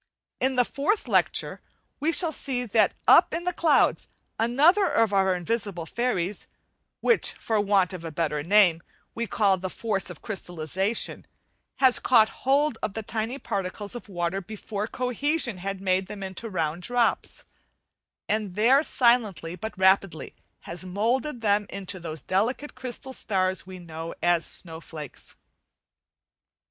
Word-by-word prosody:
In 260 Hz, 0 st, +1 dB
the 250 Hz, -1 st, +4 dB
fourth 305 Hz, -, -1 dB
lecture -, -, +1 dB, 0.4 s
we 305 Hz, +3 st, +1 dB
shall 335 Hz, -1 st, +3 dB
see 255 Hz, -4 st, -3 dB
that 220 Hz, -1 st, +2 dB
up -, -, +6 dB
in 340 Hz, -, -3 dB
the 360 Hz, 0 st, -1 dB
clouds 320 Hz, -4 st, +2 dB, 0.3 s
another 300 Hz, -, +4 dB
of 225 Hz, -3 st, +2 dB
our 190 Hz, -1 st, +3 dB
invisible 195 Hz, -2 st, -3 dB
fairies, 205 Hz, -2 st, -2 dB, 0.5 s
which, 470 Hz, -, +3 dB
for 220 Hz, -2 st, -1 dB
want 195 Hz, -2 st, +2 dB
of 180 Hz, -2 st, -7 dB
a 165 Hz, -, -5 dB
better 150 Hz, -1 st, -1 dB
name, 175 Hz, -1 st, +4 dB, 0.3 s
we 235 Hz, 0 st, -3 dB
call 200 Hz, -2 st, +2 dB
the 185 Hz, +1 st, -5 dB
"force 200 Hz, -3 st, -2 dB
of 175 Hz, -, -9 dB
crystallization," 190 Hz, +1 st, -1 dB, 0.5 s
has 260 Hz, -2 st, +5 dB
caught 220 Hz, -3 st, +4 dB, 0.2 s
hold 280 Hz, -2 st, +3 dB
of 205 Hz, -, -3 dB
the 220 Hz, -, -4 dB
tiny 225 Hz, +4 st, -3 dB
particles 200 Hz, -3 st, -4 dB
of 240 Hz, -3 st, -7 dB
water 175 Hz, +1 st, -2 dB
before 210 Hz, +1 st, -5 dB
"cohesion" 255 Hz, -, 0 dB
had 195 Hz, +1 st, -4 dB
made 190 Hz, 0 st, 0 dB
them 200 Hz, 0 st, -7 dB
into 190 Hz, +4 st, -5 dB
round 165 Hz, -3 st, -2 dB
drops, 245 Hz, +4 st, 0 dB, 0.8 s
and 210 Hz, -4 st, -2 dB
there 245 Hz, +7 st, +5 dB
silently 225 Hz, -, +1 dB
but 220 Hz, +4 st, -7 dB
rapidly, 190 Hz, -3 st, +2 dB, 0.3 s
has 170 Hz, +2 st, -5 dB
moulded 235 Hz, +8 st, -1 dB
them 205 Hz, -1 st, +2 dB
into 190 Hz, -1 st, -5 dB
those 160 Hz, -4 st, -6 dB
delicate 235 Hz, +10 st, -1 dB
crystal 260 Hz, +1 st, -6 dB
starts 185 Hz, -5 st, 0 dB
know 165 Hz, -3 st, -8 dB
as 175 Hz, -1 st, +2 dB
"snowflakes". 160 Hz, -4 st, -7 dB
205 Hz, 140 wpm, -26 LUFS, 185-240 Hz, 0.8 s, up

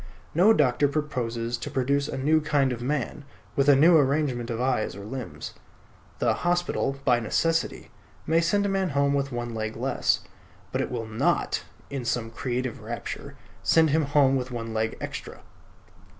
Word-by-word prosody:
No 185 Hz, +7 st, +6 dB
doctor 145 Hz, -, +3 dB
proposes 120 Hz, -6 st, -2 dB
to -, -, -5 dB
produce 140 Hz, +2 st, 0 dB
a -, -, -4 dB
new 155 Hz, +4 st, +3 dB
kind 140 Hz, -4 st, +2 dB
of 120 Hz, -, -6 dB
man, 145 Hz, +2 st, -2 dB, 0.3 s
with 140 Hz, +1 st, +3 dB
a 140 Hz, -, +8 dB
new 165 Hz, +5 st, +6 dB
arrangement 135 Hz, -4 st, +1 dB
of 115 Hz, -1 st, -3 dB
eyes 125 Hz, -7 st, 0 dB
or 100 Hz, 0 st, -8 dB
limbs. 110 Hz, -, -6 dB, 0.6 s
The -, -, +2 dB
hospital, 175 Hz, -5 st, 0 dB
by 125 Hz, -2 st, +4 dB
necessity, 165 Hz, +8 st, 0 dB, 0.3 s
may 165 Hz, +1 st, +3 dB
send 200 Hz, +5 st, +2 dB
a -, -, +1 dB
man 195 Hz, -1 st, 0 dB
home 140 Hz, 0 st, +3 dB
with 140 Hz, -1 st, 0 dB
one 120 Hz, -1 st, -4 dB
leg 110 Hz, 0 st, -3 dB
less: -, -, +1 dB, 0.5 s
but -, -, 0 dB
it -, -, -2 dB
will 115 Hz, -, -3 dB
not 110 Hz, 0 st, 0 dB, 0.3 s
(in 140 Hz, -2 st, -3 dB, 0.2 s
a 115 Hz, -1 st, -6 dB
creative 125 Hz, +1 st, -3 dB
rapture) -, -, -6 dB, 0.3 s
send 160 Hz, -2 st, +4 dB
him 155 Hz, 0 st, +2 dB
home 140 Hz, -1 st, +4 dB
with 130 Hz, -1 st, -2 dB
one 115 Hz, -2 st, -5 dB
leg 110 Hz, 0 st, -1 dB
extra. -, -, -7 dB
135 Hz, 170 wpm, -26 LUFS, 120-150 Hz, 0.6 s, a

